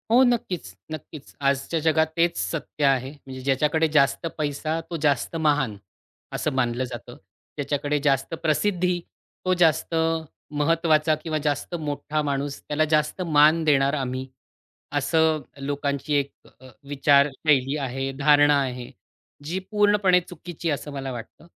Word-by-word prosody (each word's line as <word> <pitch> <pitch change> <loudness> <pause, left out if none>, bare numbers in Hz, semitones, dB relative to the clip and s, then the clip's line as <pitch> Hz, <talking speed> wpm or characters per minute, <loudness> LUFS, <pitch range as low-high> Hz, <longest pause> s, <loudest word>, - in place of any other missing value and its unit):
हो, 245 +3 +6
नक्कीच, 190 - -1 0.2
नक्कीच, 155 -1 -9
आजच्या 140 +4 0
जगात 160 0 +2
तेच 170 0 +2
सत्य 155 -2 -3
आहे. 135 -1 +2
म्हणजे 135 -3 -10
ज्याच्याकडे 150 +4 +2
जास्त 150 +1 +2
पैसा 155 +1 -2
तो 170 - -3
जास्त 145 +2 +1
महान, 145 -9 +1 0.6
असं - - -1
मानलं 125 -1 0
जातं. 120 -2 -8 0.4
ज्याच्याकडे 145 +1 -1
जास्त 135 +1 +1
प्रसिद्धी 180 +2 +1 0.5
तो 185 - +3
जास्त 165 -2 +2 0.6
महत्त्वाचा 155 0 +3
किंवा 155 0 -3
जास्त 145 +4 -2
मोठा 150 -1 -2
माणूस. 140 -1 -3
त्याला 155 +1 +1
जास्त 150 +4 +1
मान 160 -1 +4
देणार 140 -3 +3
आम्ही, 130 -2 -3 0.7
असं 155 +2 +2 0.2
लोकांची 140 +1 -2
एक 140 -1 0 0.3
अ, 130 - -14 0.2
विचारशैली 140 0 +3
आहे, 135 -1 -3
धारणा 145 0 +5
आहे. 125 -2 -5 0.5
जी 170 +5 -2
पूर्णपणे 205 -3 +4
चुकीची 175 -1 -7
आहे - - +2
असं 145 +1 -7
मला 135 -1 -4
वाटतं. 120 +7 -10
150 Hz, 135 wpm, -24 LUFS, 140-160 Hz, 0.7 s, हो